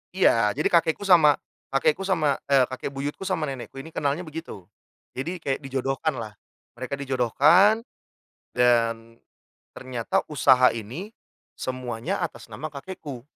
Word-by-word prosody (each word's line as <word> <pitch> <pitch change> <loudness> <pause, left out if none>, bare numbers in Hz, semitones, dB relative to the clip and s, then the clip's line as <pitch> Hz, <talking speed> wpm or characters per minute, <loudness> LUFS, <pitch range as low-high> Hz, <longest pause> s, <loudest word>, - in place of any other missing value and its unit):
Iya, 115 - +3
jadi 150 - +1
kakekku 170 +3 +2
sama 160 -7 +6 0.3
kakekku 155 +7 +1
sama, 155 -7 +1
e 140 -2 +5
kakek 130 - -5
buyutku 145 +7 -4
sama 185 -5 -1
nenekku 135 -4 -6
ini 135 +4 -8
kenalnya 145 +3 -1
begitu. 155 - -8 0.5
Jadi 165 +8 -4
kayak 135 -1 -1
dijodohkanlah, 135 -3 -2 0.5
mereka 130 +2 -3
dijodohkan. 140 - +4 0.7
Dan, 115 -2 +1 0.5
ternyata 125 -3 -2
usaha 130 -3 +5
ini, 120 - -6 0.5
semuanya 125 -3 -3
atas - - -5
nama 155 - -6
kakekku 140 -4 -8
135 Hz, 120 wpm, -25 LUFS, 125-160 Hz, 0.7 s, sama